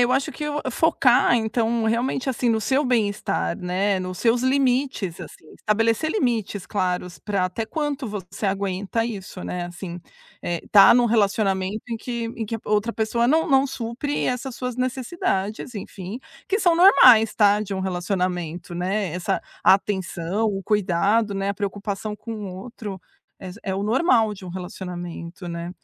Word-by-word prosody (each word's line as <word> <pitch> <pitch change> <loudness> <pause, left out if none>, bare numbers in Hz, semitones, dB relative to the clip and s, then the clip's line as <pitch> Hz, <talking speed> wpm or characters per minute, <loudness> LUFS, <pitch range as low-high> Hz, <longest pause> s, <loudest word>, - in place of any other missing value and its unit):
eu 245 +1 +4
acho 270 +1 0
que 300 - -5
o 295 0 -2
focar 250 -6 +4
então, 225 0 0
realmente, 245 +4 0
assim, 245 -1 0
no 220 -1 +2
seu 270 +6 +1
bem-estar, 205 - 0
né. 185 +2 0
Nos 185 -1 -5
seus 240 +1 +2
limites, 260 - +1
assim. - - -11
Estabelecer 225 +8 +1
limites 230 - -1
claros 180 -3 -2
pra 200 -3 -1
até 205 +5 -4
quanto 285 -2 -3
você 200 0 -6
aguenta 195 +3 -1
isso, 195 -5 -6
né. 175 -1 -3
Assim, 175 0 -7 0.4
eh, 170 -1 -2
tá 195 -2 +9
num 245 -1 +4
relacionamento 205 -2 +1
em 230 - -2
que 235 0 -4
em 225 - -2
que 225 - -3
a - - -13
outra 210 +2 +1
pessoa 235 +2 0
não 320 +3 +3
não 270 0 +4
supre 255 +5 -3
essas 250 0 -3
suas 250 -2 -3
necessidades, 250 - -2
enfim, 195 +2 -7 0.3
que 405 - +1
são 345 -2 +4
normais, 255 - +7
tá, 205 -1 +4
de 205 -2 -4
um - - -3
relacionamento, 180 -2 -2
né. 185 0 -1
Essa 180 - -1 0.2
atenção, 190 0 +1
o 195 -1 -2
cuidado, 205 +2 +1
né, 195 0 -1
a 200 - -3
preocupação 205 +1 -4
com 230 - -7
o 205 -4 -6
outro 215 -6 -8 0.4
é 185 - -7
é 190 -2 -2
o 195 - -2
normal 225 -3 +3
de 190 - -12
um - - -7
relacionamento, 175 -1 -7
né. 170 +1 -5
210 Hz, 165 wpm, -23 LUFS, 190-240 Hz, 0.4 s, tá